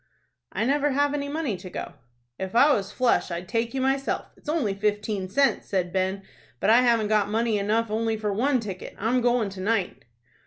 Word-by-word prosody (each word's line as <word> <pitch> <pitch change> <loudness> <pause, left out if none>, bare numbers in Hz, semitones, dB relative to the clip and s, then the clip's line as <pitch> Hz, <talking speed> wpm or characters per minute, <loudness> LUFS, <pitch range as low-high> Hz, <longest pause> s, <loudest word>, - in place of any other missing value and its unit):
"I 220 - -1
never 285 +2 +2
have 285 +1 +2
any 285 -1 -2
money 295 -7 -2
to 180 +1 -9
go." 175 - -6 0.5
"If 190 +2 -5
I 280 +5 +6
was 200 -3 -2
flush 250 +2 +1
I'd 175 +1 -5
take 230 +4 -1
you 265 - 0
myself. 270 +1 -1
It's - - -11
only 290 -11 0
fifteen 205 -1 -1
cents," 270 +3 +1
said 180 -3 -1
Ben. 190 +1 -1 0.4
"But 205 - +3
I 235 +2 +7
haven't 230 -3 +3
got 210 -2 +2
money 220 0 +1
enough 215 +2 0
only 225 0 0
for 210 -1 -2
one 255 +5 +2
ticket. 195 -5 -7
I'm 240 +4 +1
goin' 240 -3 +2
to 190 -1 -8
night." 200 -2 -1
220 Hz, 200 wpm, -25 LUFS, 200-255 Hz, 0.5 s, I